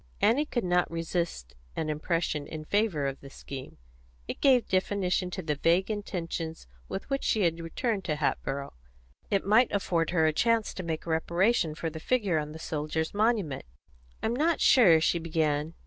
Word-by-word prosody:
Annie 230 Hz, +9 st, +3 dB
could 240 Hz, -, -1 dB
not 180 Hz, 0 st, +2 dB
resist 165 Hz, -, -3 dB, 0.2 s
an 160 Hz, -, -2 dB
impression 155 Hz, -1 st, -1 dB
in 155 Hz, -1 st, -7 dB
favour 200 Hz, -7 st, +1 dB
of 135 Hz, 0 st, -3 dB
the 140 Hz, -, -11 dB
scheme. 135 Hz, -1 st, -9 dB, 0.5 s
It -, -, -6 dB
gave 255 Hz, -4 st, +4 dB
definition 185 Hz, -1 st, 0 dB
to 185 Hz, +1 st, -5 dB
the 155 Hz, -1 st, 0 dB
vague 170 Hz, +7 st, +2 dB
intentions 170 Hz, -5 st, -4 dB, 0.2 s
with 195 Hz, -, -5 dB
which 275 Hz, -, 0 dB
she 215 Hz, -, +2 dB
had 165 Hz, -1 st, +1 dB
returned 195 Hz, +5 st, -2 dB
to 155 Hz, -, 0 dB
Hatboro'; 140 Hz, -2 st, -2 dB, 0.6 s
it 200 Hz, -1 st, +1 dB
might 220 Hz, +5 st, +4 dB
afford 170 Hz, -5 st, 0 dB
her 165 Hz, -3 st, +2 dB
a 155 Hz, -, +3 dB
chance 230 Hz, +4 st, +2 dB
to -, -, -5 dB
make 165 Hz, -2 st, -4 dB
reparation 170 Hz, +2 st, +1 dB
for 165 Hz, 0 st, -3 dB
the 160 Hz, -, -7 dB
figure 200 Hz, -5 st, +1 dB
on 150 Hz, 0 st, -5 dB
the 155 Hz, -, -8 dB
soldiers' 160 Hz, 0 st, -3 dB
monument. 205 Hz, -, 0 dB, 0.6 s
"I'm 225 Hz, +2 st, 0 dB
not 320 Hz, +4 st, +2 dB
sure," 185 Hz, -11 st, +6 dB
she 170 Hz, +2 st, +2 dB
began. 160 Hz, -1 st, -1 dB
170 Hz, 175 wpm, -28 LUFS, 155-205 Hz, 0.6 s, sure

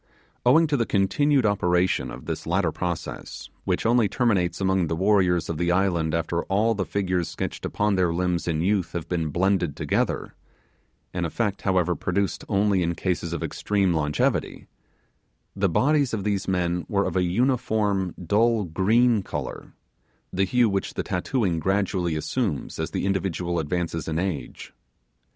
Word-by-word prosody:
Owing 160 Hz, +7 st, +6 dB
to 150 Hz, -2 st, 0 dB
the 115 Hz, -, 0 dB
continued 130 Hz, +7 st, +2 dB
operation 90 Hz, -3 st, +1 dB
of -, -, -9 dB
this -, -, -4 dB
latter 85 Hz, -1 st, +1 dB
process, 85 Hz, 0 st, -5 dB
which -, -, -1 dB
only 115 Hz, -2 st, +3 dB
terminates 100 Hz, -8 st, +1 dB
among 95 Hz, -2 st, +1 dB
the 80 Hz, -, -1 dB
warriors 90 Hz, -2 st, +2 dB
of 80 Hz, -2 st, -4 dB
the 85 Hz, 0 st, +1 dB
island 85 Hz, -4 st, +1 dB
after 85 Hz, +1 st, -1 dB
all 105 Hz, +4 st, +2 dB
the 100 Hz, -3 st, -3 dB
figures 90 Hz, -4 st, -1 dB
stretched -, -, -4 dB
upon 105 Hz, 0 st, 0 dB
their 90 Hz, -3 st, +2 dB
limbs 90 Hz, 0 st, -1 dB
in 80 Hz, -2 st, 0 dB
youth 95 Hz, -1 st, 0 dB
have 85 Hz, -2 st, -4 dB
been 80 Hz, -3 st, -1 dB
blended 90 Hz, -1 st, +1 dB
together -, -, -1 dB, 0.8 s
an 90 Hz, -, -2 dB
effect, 100 Hz, +4 st, -2 dB
however, 90 Hz, -2 st, +2 dB
produced 95 Hz, +3 st, -1 dB
only 100 Hz, -2 st, +2 dB
in 85 Hz, 0 st, 0 dB
cases 85 Hz, -1 st, -2 dB
of 85 Hz, -, -3 dB
extreme 100 Hz, -3 st, 0 dB
longevity 75 Hz, -2 st, 0 dB, 0.9 s
the 100 Hz, -1 st, +1 dB
bodies 140 Hz, -, +2 dB
of 100 Hz, -, -4 dB
these 100 Hz, -2 st, -1 dB
men 90 Hz, -2 st, 0 dB
were 100 Hz, -1 st, +1 dB
of -, -, -3 dB
a 95 Hz, -, +3 dB
uniform 105 Hz, -2 st, +1 dB
dull 110 Hz, +4 st, +3 dB
green 105 Hz, +7 st, +3 dB
colour -, -, -6 dB, 0.6 s
the 95 Hz, +1 st, +2 dB
hue 120 Hz, +4 st, +3 dB
which 100 Hz, -2 st, -2 dB
the -, -, -2 dB
tattooing 95 Hz, -2 st, -1 dB
gradually 95 Hz, -2 st, 0 dB
assumes 80 Hz, -, -2 dB
as -, -, -2 dB
the -, -, -2 dB
individual 90 Hz, -3 st, -1 dB
advances 80 Hz, +1 st, -2 dB
in 80 Hz, 0 st, -1 dB
age. 85 Hz, -8 st, -4 dB
95 Hz, 160 wpm, -25 LUFS, 85-105 Hz, 0.9 s, Owing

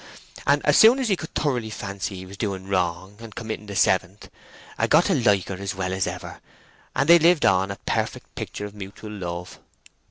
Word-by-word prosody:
And -, -, +3 dB
as -, -, +4 dB
soon 230 Hz, +4 st, +8 dB
as 260 Hz, -4 st, -1 dB
he 195 Hz, -, +3 dB
could 160 Hz, -3 st, -9 dB
thoroughly 125 Hz, -7 st, -1 dB
fancy 100 Hz, -2 st, -5 dB
he 95 Hz, 0 st, -8 dB
was 95 Hz, +2 st, -11 dB
doing 95 Hz, -2 st, -4 dB
wrong 95 Hz, +1 st, -2 dB
and 115 Hz, -2 st, -11 dB
committing 110 Hz, -2 st, -6 dB
the 100 Hz, -, -6 dB
seventh, 95 Hz, +2 st, +1 dB, 0.5 s
'a -, -, +2 dB
got 160 Hz, +4 st, +5 dB
to 195 Hz, -, +2 dB
like 105 Hz, -, +2 dB
her 95 Hz, -, -4 dB
as 100 Hz, -1 st, -4 dB
well 95 Hz, 0 st, -2 dB
as 95 Hz, -1 st, -1 dB
ever, -, -, -7 dB, 0.6 s
and 135 Hz, +2 st, +1 dB
they 170 Hz, +1 st, +8 dB
lived 165 Hz, -1 st, +4 dB
on 95 Hz, +1 st, +3 dB
a 100 Hz, -, -4 dB
perfect -, -, -2 dB
picture 105 Hz, -, -6 dB
of 105 Hz, -, -9 dB
mutel 105 Hz, +1 st, -9 dB
love." 90 Hz, -3 st, -6 dB
100 Hz, 210 wpm, -24 LUFS, 95-120 Hz, 0.6 s, soon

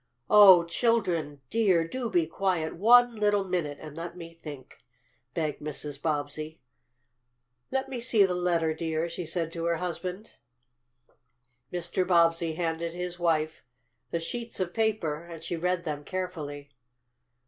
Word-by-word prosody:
"Oh, 195 Hz, -5 st, +9 dB
children 170 Hz, -, 0 dB
dear, 190 Hz, -8 st, +3 dB
do 245 Hz, +5 st, -3 dB
be 175 Hz, -5 st, +2 dB
quiet 165 Hz, -1 st, -1 dB
one 240 Hz, +4 st, +6 dB
little 205 Hz, -1 st, +2 dB
minute 175 Hz, -6 st, -2 dB
and 150 Hz, -2 st, -9 dB
let 170 Hz, +2 st, -6 dB
me 165 Hz, -1 st, -9 dB
think," 150 Hz, -6 st, -11 dB, 0.6 s
begged 155 Hz, -3 st, -2 dB
Mrs. 150 Hz, -1 st, -6 dB
Bobbsey. 155 Hz, +1 st, -3 dB, 1.1 s
"Let 265 Hz, 0 st, -1 dB
me 260 Hz, -2 st, -5 dB
see 230 Hz, -4 st, +4 dB
the 185 Hz, -, -1 dB
letter, 170 Hz, -3 st, +1 dB
dear," 160 Hz, 0 st, -2 dB
she 170 Hz, 0 st, -5 dB
said 165 Hz, 0 st, -1 dB
to 165 Hz, 0 st, -4 dB
her 170 Hz, 0 st, +2 dB
husband. 180 Hz, +4 st, -5 dB, 1.4 s
Mr. 175 Hz, +1 st, -1 dB
Bobbsey 165 Hz, -2 st, +3 dB
handed 165 Hz, 0 st, -2 dB
his 180 Hz, 0 st, -5 dB
wife 160 Hz, -2 st, 0 dB, 0.5 s
the 170 Hz, -, -1 dB
sheets 230 Hz, +8 st, -5 dB
of 180 Hz, -2 st, -2 dB
paper, 205 Hz, -9 st, 0 dB
and 165 Hz, -2 st, -10 dB
she 170 Hz, -, -3 dB
read 180 Hz, +1 st, -1 dB
them 150 Hz, -3 st, -4 dB
carefully. 150 Hz, -6 st, -5 dB
170 Hz, 140 wpm, -28 LUFS, 160-185 Hz, 1.4 s, Oh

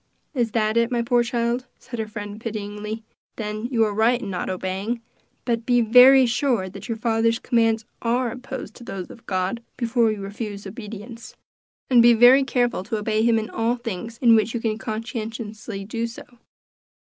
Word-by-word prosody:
"Is 235 Hz, -5 st, 0 dB
that 220 Hz, 0 st, +1 dB
it, 235 Hz, 0 st, +3 dB
my 240 Hz, -1 st, +1 dB
poor 240 Hz, +1 st, +3 dB
child?" 240 Hz, +1 st, -1 dB
said 240 Hz, -3 st, -8 dB
her 220 Hz, -, -2 dB
friend 210 Hz, 0 st, -7 dB
pityingly. 210 Hz, 0 st, -5 dB, 0.3 s
"Then 215 Hz, 0 st, -4 dB
you 235 Hz, -3 st, +2 dB
are 210 Hz, -, -2 dB
right 230 Hz, +4 st, +3 dB
in 205 Hz, -5 st, -5 dB
not 180 Hz, -, -3 dB
obeying; 190 Hz, +5 st, -3 dB, 0.5 s
but 235 Hz, -2 st, 0 dB
be 245 Hz, 0 st, +3 dB
very 250 Hz, +4 st, +8 dB
sure 240 Hz, -5 st, 0 dB
that 190 Hz, -, -10 dB
your 230 Hz, -, -2 dB
father's 230 Hz, 0 st, +1 dB
commands 225 Hz, -2 st, +1 dB, 0.2 s
are 240 Hz, +1 st, 0 dB
opposed 260 Hz, +2 st, -7 dB
to 245 Hz, -, -12 dB
those 195 Hz, -5 st, -6 dB
of 230 Hz, -, -15 dB
God, 190 Hz, +4 st, -1 dB, 0.2 s
before 235 Hz, -2 st, +2 dB
you 210 Hz, -2 st, -5 dB
refuse 200 Hz, 0 st, -6 dB
obedience; 220 Hz, +2 st, -9 dB, 0.5 s
and 245 Hz, -2 st, +6 dB
be 235 Hz, 0 st, +7 dB
very 245 Hz, +4 st, +7 dB
careful 245 Hz, -5 st, 0 dB
to 220 Hz, +1 st, -2 dB
obey 215 Hz, +1 st, 0 dB
him 230 Hz, 0 st, +3 dB
in 220 Hz, 0 st, -3 dB
all 230 Hz, +2 st, 0 dB
things 230 Hz, -1 st, -6 dB
in 235 Hz, -1 st, +7 dB
which 220 Hz, +1 st, +2 dB
you -, -, 0 dB
can 220 Hz, -1 st, -2 dB
conscientiously 220 Hz, -2 st, -5 dB
do 230 Hz, +2 st, -2 dB
so." 230 Hz, -, -10 dB
230 Hz, 185 wpm, -23 LUFS, 215-240 Hz, 0.5 s, very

